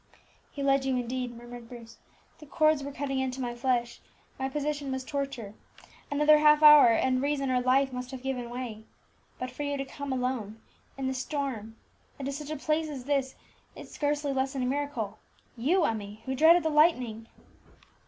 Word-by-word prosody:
"He 280 - -5
led 275 -1 +3
you 265 -1 0
indeed," 245 0 -3
murmured 240 -1 -11
Bruce. 230 -2 -12 0.4
"The 305 - -13
cords 310 0 +2
were 280 - -5
cutting 275 -1 -3
into 260 0 -2
my 245 -2 -3
flesh, 240 -1 -1 0.4
my 265 0 -1
position 290 -1 -3
was 260 0 -3
torture; 275 -7 -4 0.6
another 300 +1 +5
half 300 0 +5
hour 300 -3 +10
and 255 +2 +2
reason 275 -1 0
or 250 -1 +2
life 265 +1 +2
must 250 0 -5
have 260 -1 -8
given 250 -3 -3
way. 240 -3 -6 0.5
But 255 0 -5
for 255 - -8
you 285 -1 -2
to 275 - -3
come 280 +1 -6
alone, 250 -4 -2 0.4
in 270 - -3
the 260 - 0
storm, 255 -5 -4 0.4
and 275 - -6
to 275 - -2
such 290 +1 -6
a 310 - -3
place 310 +2 -1
as 275 -4 -6
this, 275 -2 0 0.4
is - - -11
scarcely 290 -1 -1
less 265 +1 -1
than 265 -2 -2
a - - 0
miracle 250 -6 -3 0.4
you, 315 +10 +2
Emmie, 215 0 -4
who 265 - -2
dreaded 320 +5 +6
the 320 - +1
lightning!" 250 -8 +2
265 Hz, 185 wpm, -28 LUFS, 245-290 Hz, 0.6 s, hour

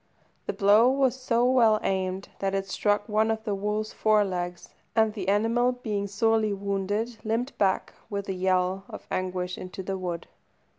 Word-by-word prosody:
The - - -1
blow 210 +5 +5
was 265 -1 +2
so 245 -2 +1
well 235 -4 +4
aimed 190 0 -1
that 195 0 -1
it 195 0 -2
struck 205 +2 0
one 215 0 +2
of 220 0 -1
the 210 -2 -1
wolf's 210 +2 -2
fore 215 -1 +3
legs, 175 -2 -4 0.3
and 220 -1 +3
the 195 -4 -5
animal, 230 +5 +2
being 210 -5 -3
sorely 215 +1 +2
wounded, 200 +3 -2
limped 230 +5 -1
back, 190 -2 +1 0.2
with 200 -2 -4
a 190 - -1
yell 185 0 +1
of - - -9
anguish, 180 -1 -2
into 185 +1 -7
the 190 0 -3
wood. 175 -2 -4
205 Hz, 170 wpm, -27 LUFS, 190-225 Hz, 0.3 s, blow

